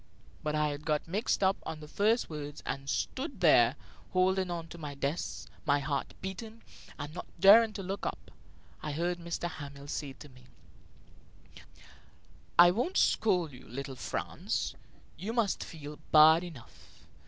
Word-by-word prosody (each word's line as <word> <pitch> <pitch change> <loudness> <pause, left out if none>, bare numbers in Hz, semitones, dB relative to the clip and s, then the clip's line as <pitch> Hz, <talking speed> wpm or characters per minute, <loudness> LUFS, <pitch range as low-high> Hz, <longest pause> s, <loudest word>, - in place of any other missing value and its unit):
But 150 0 -1
I 150 -1 +1
got 150 +1 -1
mixed 200 +3 0
up 190 +1 +3
on 155 - -6
the 150 - -10
first 215 +9 +2
words 150 -2 -7
and 135 +1 -4
stood - - -2
there, - - +6 0.4
holding 185 0 +2
on 170 -1 -4
to 170 - -10
my 145 -3 -6
desk, 140 +4 -3 0.2
my 145 -2 +3
heart 140 -1 -3
beating, 220 +4 -7 0.3
and 145 +1 -6
not 180 - -7
daring 215 +5 +8
to 195 - -5
look 195 +2 -4
up. - - -6 0.5
I 150 - -3
heard 175 +3 -1
M. 170 - -10 0.2
Hamel 140 -2 -9
say 145 -1 -4
to 150 - -13
me: 125 -2 -18 2.1
"I 175 0 +9
won't 245 - -1
scold 180 -8 +3
you, 125 - -13
little 135 +3 -6
Franz; - - -3 0.4
you 205 +7 -4
must 230 -4 +1
feel 150 -2 -9
bad 160 +2 +8
enough. 155 -10 -13
160 Hz, 155 wpm, -31 LUFS, 145-190 Hz, 2.1 s, I